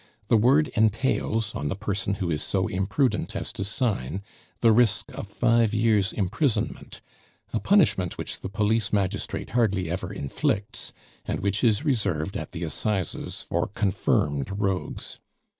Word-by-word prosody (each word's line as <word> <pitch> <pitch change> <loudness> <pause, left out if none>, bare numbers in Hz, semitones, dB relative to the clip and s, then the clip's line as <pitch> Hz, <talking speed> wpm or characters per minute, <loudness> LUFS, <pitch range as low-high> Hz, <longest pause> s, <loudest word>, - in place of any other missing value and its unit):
The - - +5
word 135 +7 +4
entails, 110 -1 +1
on 75 - -3
the 95 - -1
person 100 -1 -2
who 90 -3 -2
is 75 -1 -1
so 95 -1 0
imprudent 105 +6 0
as - - -3
to - - -3
sign, 100 - -1 0.4
the 115 - +6
risk 110 -3 +3
of - - -6
five 115 +1 +2
years' 110 -2 +3
imprisonment 110 - -1 0.5
a 110 - +1
punishment 110 - +3
which - - -4
the - - -5
police 105 +2 +1
magistrate 100 0 -1
hardly 100 -7 +1
ever 95 - -3
inflicts, 95 +8 -2 0.3
and - - -2
which 100 +3 0
is 115 +4 +3
reserved 100 - 0
at - - -4
the 85 -1 -5
assizes 95 +2 -2
for - - -1
confirmed 90 -7 0
rogues. 95 -3 -2
105 Hz, 145 wpm, -26 LUFS, 95-115 Hz, 0.5 s, the